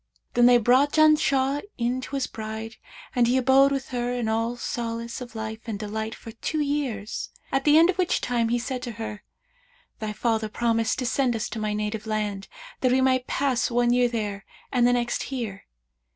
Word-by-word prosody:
Then 240 0 +5
they 245 0 +7
brought 255 +5 +3
Janshah 290 -3 +4 0.2
in 245 +2 0
to 280 - -6
his 270 -2 0
bride 220 0 -6 0.4
and 240 -1 +4
he 250 +2 +3
abode 265 +2 +5
with 270 -1 -2
her 245 -1 -2
in 245 -2 -2
all 230 +2 0
solace 235 0 -4
of 240 -2 -9
life 220 0 -5
and 220 -3 -3
delight 220 +2 -4
for 225 - -10
two 305 +7 -3
years, 280 -8 -2 0.2
at 270 0 0
the 300 0 +6
end 335 +3 +6
of 375 - -12
which 360 - +2
time 235 -2 0
he 240 - +2
said 250 +1 -4
to 240 -2 -5
her, 215 -2 -6 0.8
'Thy 215 -1 -3
father 220 0 0
promised 230 0 0
to 260 - -2
send 250 0 +1
us 220 - -2
to 225 - -5
my 215 -1 -1
native 210 +1 -3
land, 210 -2 -2 0.3
that 255 - +2
we 260 - +4
might 260 -1 +2
pass 265 -4 +1
one 240 0 +2
year 245 0 +4
there 205 -4 -3 0.3
and 245 -2 +4
the 245 - +4
next 240 -1 0
here.' 230 -7 -5
240 Hz, 200 wpm, -25 LUFS, 220-260 Hz, 0.8 s, they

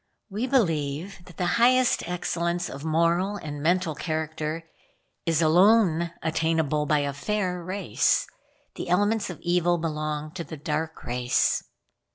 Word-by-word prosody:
"We 220 +6 -2
believe 175 - 0
that 180 - -15
the 180 - 0 0.2
highest 255 +1 +4
excellence 175 0 -2
of 140 +1 -8
moral 170 +5 +1
and 145 -6 -6
mental 175 +1 +1
character 155 +1 -3 0.6
is 165 0 +2
alone 170 0 +4
attainable 160 -2 0
by 150 -2 +3
a 140 - -2
fair 180 +3 -2
race. 185 - +1 0.5
The - - -6
elements 205 +4 +2
of 180 - -7
evil 175 0 +2
belong 155 -2 -3
to 175 - -5
the 160 - -8
dark 155 +2 -3
race." 125 +1 +1
165 Hz, 135 wpm, -26 LUFS, 155-180 Hz, 0.6 s, highest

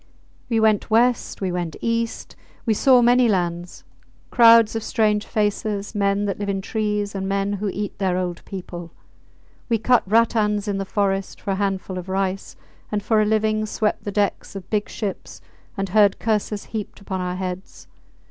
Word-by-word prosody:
We 225 -2 +2
went 215 -2 +2
West, 235 +1 +2
we 190 -2 -1
went 175 -3 -3
East. 230 0 -2 0.3
We 225 - +3
saw 250 +3 +5
many 245 +1 +5
lands, 175 -3 -2 0.5
crowds 230 -2 +6
of 225 - -1
strange 215 -2 +1
faces, 205 -1 -1
men 200 0 +1
that 200 -1 -3
live 205 -1 -3
in 195 -1 -1
trees 210 0 -2
and 195 -1 -3
men 200 +1 0
who 205 +1 -2
eat 205 +1 -5
their 185 -2 +1
old 180 -2 -3
people. 175 -3 -8 0.8
We 230 - +3
cut 245 +2 +3
rattans 215 -1 +2
in 200 -1 -1
the 195 - -2
forest 195 -1 -1
for 200 - -3
a - - +1
handful 190 -2 -2
of 180 +1 -9
rice, 190 0 -2 0.4
and 205 -1 -1
for 220 0 +3
a - - +2
living 215 0 +1
swept 210 0 -1
the 205 - -4
decks 200 0 -1
of 190 -2 -7
big 210 -1 0
ships 205 -4 -5 0.4
and 195 -1 -2
heard 205 0 +4
curses 210 -2 -1
heaped 210 -2 -5
upon 190 -2 -4
our 180 0 -2
heads. 185 0 -6
205 Hz, 175 wpm, -22 LUFS, 195-220 Hz, 0.8 s, crowds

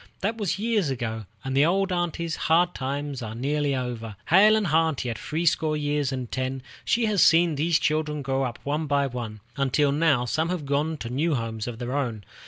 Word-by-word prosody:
That 210 +4 0
was 205 -6 -1
years 210 -6 +1
ago, 115 -5 -3 0.2
and 135 0 -3
the 140 - +5
old 190 +4 +2
aunty's 170 -2 -1
hard 175 +2 +2
times 140 0 -4
are 110 -1 -5
nearly 145 +3 0
over. 120 -4 -4
Hale 210 +5 +7
and 215 -1 +1
hearty 160 -6 +1
at 115 - -6
three 160 +3 -3
score 155 -2 +2
years 145 -2 0
and 130 -3 -4
ten, 130 0 -3 0.2
she 235 0 +2
has 210 -5 +2
seen 165 0 +5
these 155 +3 +2
children 150 -2 -1
grow 135 +1 0
up 125 -3 -2
one 150 +2 -1
by 140 0 +2
one, 120 -5 -5 0.2
until 140 +1 +2
now 145 -4 +2
some 160 +6 0
have 175 -5 -3
gone 145 +3 0
to 115 - -6
new 150 +4 +1
homes 115 -2 -4
of 120 -2 -5
their 125 +2 -4
own. 120 -7 -2
145 Hz, 205 wpm, -25 LUFS, 130-165 Hz, 0.2 s, Hale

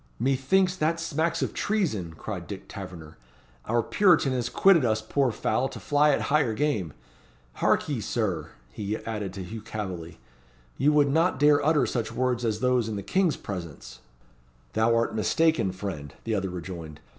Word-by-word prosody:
"Methinks 135 +9 +2
that 165 0 +1
smacks 165 0 -1
of - - -3
treason," 110 - -1
cried 90 -1 -6
Dick 100 -1 -8
Taverner. 85 -6 -9 0.5
"Our 120 +1 +1
Puritan 170 - +3
has 120 -2 -1
quitted 190 -6 +5
us 110 -2 +2
poor 125 +4 0
fowl 115 +4 0
to - - -8
fly 145 +1 +3
at 140 - +2
higher 140 -7 +1
game. 105 - -1 0.7
Hark - - +3
ye, 140 -7 -2
Sir!" 95 -10 -2 0.2
he 105 +8 -3
added 105 -4 -4
to 95 -1 -6
Hugh 110 +5 -7
Calveley. 95 -7 -6 0.6
"You 145 - +3
would 145 -2 +4
not 165 0 +2
dare 145 0 +5
utter 150 0 +3
such 115 -3 -2
words 125 -1 0
as 110 -1 -1
those 125 -3 +2
in 110 - -3
the 100 - -4
King's 180 - +1
presence." 80 -11 -7 0.7
"Thou 110 +1 +3
art 115 0 +1
mistaken, 155 - +2
friend," 90 -7 -6
the 115 - -2
other 95 -2 -1
rejoined. 85 -3 -7
115 Hz, 170 wpm, -27 LUFS, 95-145 Hz, 0.7 s, quitted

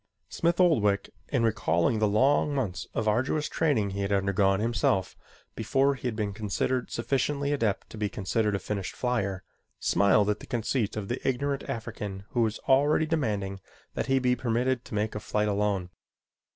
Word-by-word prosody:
Smith 170 +1 0
Oldwick, 105 - +3 0.2
in 125 -5 0
recalling 105 -2 +1
the 105 - +3
long 140 +7 +3
months 95 -9 -2
of 110 - -1
arduous 130 +8 +1
training 125 -11 +1
he 100 +1 -3
had 100 0 -1
undergone 95 0 +2
himself 110 -4 0 0.4
before 135 +5 +2
he 130 -1 -5
had 115 - -2
been 105 -2 -2
considered 110 +5 -1
sufficiently 140 +4 0
adept 110 -8 -1
to 110 - -9
be 105 -1 0
considered 105 +1 0
a - - +1
finished 100 0 -4
flier, 100 -7 -1 0.4
smiled 100 +1 +3
at 105 - -3
the - - -11
conceit 115 -3 -1
of 100 -2 -4
the 120 - -3
ignorant 140 +2 0
African 105 -4 -5
who 120 - 0
was 110 -1 +1
already 145 +4 +4
demanding 105 -11 -1 0.3
that - - -3
he 135 0 +3
be 125 -1 +2
permitted 125 +1 0
to - - -7
make 105 +1 -1
a 105 - -3
flight 105 0 -1
alone. 100 -3 0
110 Hz, 175 wpm, -28 LUFS, 100-130 Hz, 0.4 s, already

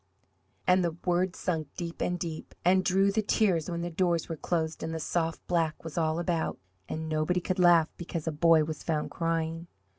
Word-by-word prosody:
And 180 0 +4
the 170 -1 -1
words 180 +1 +1
sunk 160 -5 -2
deep 170 -1 -5
and 180 - 0
deep 165 -2 -6
and 185 +1 +5
drew 195 +2 +3
the 215 +2 +1
tears 190 -6 +1
when 170 -1 -3
the 175 - -3
doors 170 -1 +1
were 165 - -3
closed 160 0 -2
and 160 0 -3
the - - -3
soft 165 0 -2
black 165 -3 0
was 165 -2 -7
all 160 -1 +1
about 170 -1 -1 0.3
and 160 0 -3
nobody 155 +3 +1
could 185 +1 -2
laugh 170 -3 +5
because 170 -2 -5
a 160 - 0
boy 160 +1 +5
was 155 -1 -5
found 155 -2 -2
crying! 165 0 -2
170 Hz, 200 wpm, -29 LUFS, 160-180 Hz, 0.3 s, and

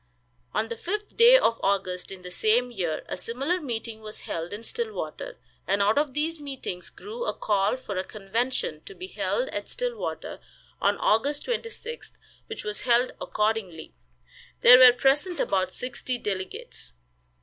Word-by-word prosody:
On 215 +1 0
the 230 - -3
fifth 420 - -4
day 480 +2 +9
of 230 - +2
August, 190 -2 0
in 190 -2 -9
the 180 - -8
same 230 +6 +2
year, 175 -8 -2
a - - -3
similar 265 - -1
meeting 230 -6 -5
was 215 0 -8
held 165 +1 -4
in 210 +2 -6
Stillwater, 470 - -4 0.3
and 200 +1 +2
out 205 +6 +4
of 290 -3 -1
these 315 +2 -1
meetings 265 -11 -5
grew 460 +4 -7
a - - -1
call 205 +2 +1
for 215 -6 -6
a 185 - 0
convention, 235 - -2
to 405 - -10
be 370 - -7
held - - -1
at - - -4
Stillwater, - - -3 0.4
on - - +3
August 280 +7 +2
26th, 470 0 -5 0.3
which 440 - -6
was 210 0 -3
held 245 0 +3
accordingly. 210 -7 -1 0.7
There 250 +1 +10
were 255 -1 +11
present 275 +8 +2
about 185 -1 +1
sixty 250 0 -3
delegates. 190 - -5
240 Hz, 160 wpm, -27 LUFS, 200-330 Hz, 0.7 s, were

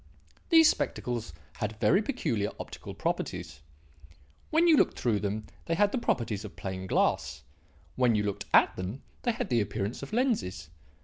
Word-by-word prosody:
These 325 -2 +8
spectacles 120 - -1 0.3
had 105 0 -3
very 190 - +4
peculiar 120 - -1
optical - - -8
properties. 65 - -3 0.9
When 325 +2 +4
you 325 - +7
looked - - +3
through 115 -4 +1
them 105 +1 -3 0.2
they 165 - +1
had 205 +3 +3
the 255 - 0
properties 115 - -1
of 105 - -9
plain 95 -1 -5
glass; 65 -7 0 0.5
when 125 -3 +3
you 105 - +1
looked 100 -1 -3
at - - +5
them 95 +9 -5 0.2
they 240 - +1
had 235 - -4
the 120 -3 +3
appearance 105 +2 -3
of 140 - -7
lenses. 150 - -1
110 Hz, 165 wpm, -29 LUFS, -, 0.9 s, These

